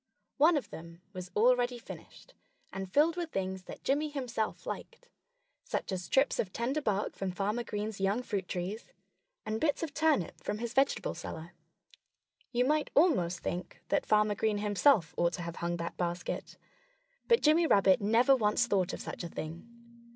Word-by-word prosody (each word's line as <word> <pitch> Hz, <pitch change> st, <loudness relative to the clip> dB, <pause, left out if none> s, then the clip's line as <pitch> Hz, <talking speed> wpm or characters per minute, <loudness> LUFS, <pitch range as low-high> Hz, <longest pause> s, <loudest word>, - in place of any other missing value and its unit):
One 310 Hz, +3 st, +5 dB
of 280 Hz, -, -5 dB
them 170 Hz, +1 st, -10 dB
was 185 Hz, -1 st, -7 dB
already 245 Hz, +2 st, +3 dB
finished, 235 Hz, -, -12 dB, 0.4 s
and 190 Hz, -1 st, -5 dB
filled 310 Hz, -, +4 dB
with 345 Hz, -2 st, -3 dB
things 190 Hz, -5 st, -3 dB
that -, -, -10 dB
Jimmy 295 Hz, +3 st, +1 dB
himself 250 Hz, -6 st, -3 dB
liked 485 Hz, +1 st, -7 dB, 0.5 s
such -, -, -3 dB
as 185 Hz, -1 st, -2 dB
strips 270 Hz, -, +2 dB
of 185 Hz, -, -1 dB
tender 260 Hz, +8 st, -1 dB
bark 210 Hz, -5 st, -1 dB
from 195 Hz, -, -3 dB
Farmer 205 Hz, +6 st, -1 dB
Green's 210 Hz, -2 st, -4 dB
young 200 Hz, +6 st, +1 dB
fruit 195 Hz, -6 st, -3 dB
trees, 185 Hz, +5 st, -4 dB, 0.6 s
and 220 Hz, +1 st, -2 dB
bits 315 Hz, +1 st, +1 dB
of 310 Hz, -3 st, -4 dB
turnip 310 Hz, -, +1 dB
from 210 Hz, -, -2 dB
his 235 Hz, +1 st, -4 dB
vegetable 270 Hz, +1 st, +1 dB
cellar. 160 Hz, +2 st, -7 dB, 1.0 s
You 245 Hz, 0 st, +2 dB
might 300 Hz, +2 st, +1 dB
almost 185 Hz, -, +3 dB
think 180 Hz, 0 st, -5 dB
that -, -, +1 dB
Farmer 210 Hz, 0 st, +3 dB
Green 210 Hz, 0 st, 0 dB
himself 205 Hz, -, +3 dB
ought 170 Hz, 0 st, +2 dB
to 175 Hz, -, -4 dB
have 170 Hz, 0 st, -6 dB
hung 175 Hz, 0 st, -2 dB
that 170 Hz, 0 st, -5 dB
basket. 175 Hz, 0 st, -3 dB, 0.7 s
But 465 Hz, 0 st, +4 dB
Jimmy 320 Hz, +2 st, +5 dB
Rabbit 195 Hz, -5 st, +5 dB
never 230 Hz, +6 st, +5 dB
once 220 Hz, 0 st, +2 dB
thought 195 Hz, -5 st, +1 dB
of -, -, -5 dB
such -, -, -6 dB
a 170 Hz, -, -5 dB
thing. 160 Hz, +6 st, -7 dB
210 Hz, 175 wpm, -31 LUFS, 185-270 Hz, 1.0 s, One